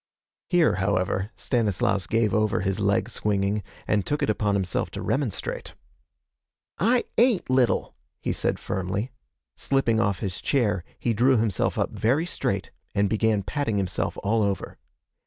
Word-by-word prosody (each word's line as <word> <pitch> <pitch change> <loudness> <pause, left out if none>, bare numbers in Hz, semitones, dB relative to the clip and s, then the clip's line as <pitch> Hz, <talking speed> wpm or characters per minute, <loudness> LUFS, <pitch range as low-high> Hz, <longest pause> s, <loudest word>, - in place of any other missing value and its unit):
Here, 175 - +3
however, 95 0 0
Stanislaus 100 -2 0
gave 115 -3 +1
over 110 +1 +2
his 95 +1 -1
leg 100 -1 +2
swinging 100 0 0 0.3
and 105 -2 +2
took 145 +8 -1
it - - +3
upon 105 -1 0
himself 95 -2 -1
to - - -6
remonstrate. 135 -7 -2 1.0
'I 235 +6 +3 0.2
ain't 230 - +3
little,' 130 -2 +2 0.3
he - - -2
said - - 0
firmly. 95 +6 -3 0.4
Slipping 125 -5 +1
off 100 -4 +1
his 95 -2 -4
chair, 105 - +1
he 120 - 0
drew 125 +4 +4
himself 110 -4 0
up - - 0
very 130 +9 +1
straight, - - -2 0.2
and 100 -1 +2
began 110 -2 +2
patting 115 -1 -1
himself 95 -3 -1
all 110 +2 +2
over. 100 -2 -2
105 Hz, 145 wpm, -25 LUFS, 100-125 Hz, 1.0 s, drew